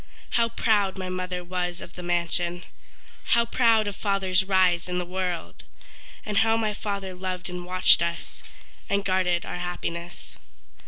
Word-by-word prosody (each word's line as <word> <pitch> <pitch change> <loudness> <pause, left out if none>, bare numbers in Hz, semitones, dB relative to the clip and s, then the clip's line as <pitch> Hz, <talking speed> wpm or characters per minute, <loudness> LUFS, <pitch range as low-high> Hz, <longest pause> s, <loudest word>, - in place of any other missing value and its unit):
How 230 -1 +2
proud 205 -4 +1
my 185 -1 -4
mother 180 -1 -3
was 180 0 -3
of 175 - -10
the 180 - -8
mansion 175 0 0 0.7
How 235 - +4
proud 225 -3 +3
of 205 - -3
father's 195 -2 +1
rise 185 -2 +2
in 180 - -1
the 180 - -1
world! 180 -2 -4 0.6
And 210 -1 -2
how 225 0 +3
my 215 -2 0
father 200 -2 -4
loved 185 0 -5
and 180 0 -6
watched 185 0 +5
us, 170 0 -3 0.5
And 200 0 0
guarded 185 -2 +1
our - - -5
happiness. 175 -1 -5
185 Hz, 155 wpm, -26 LUFS, 175-200 Hz, 0.7 s, watched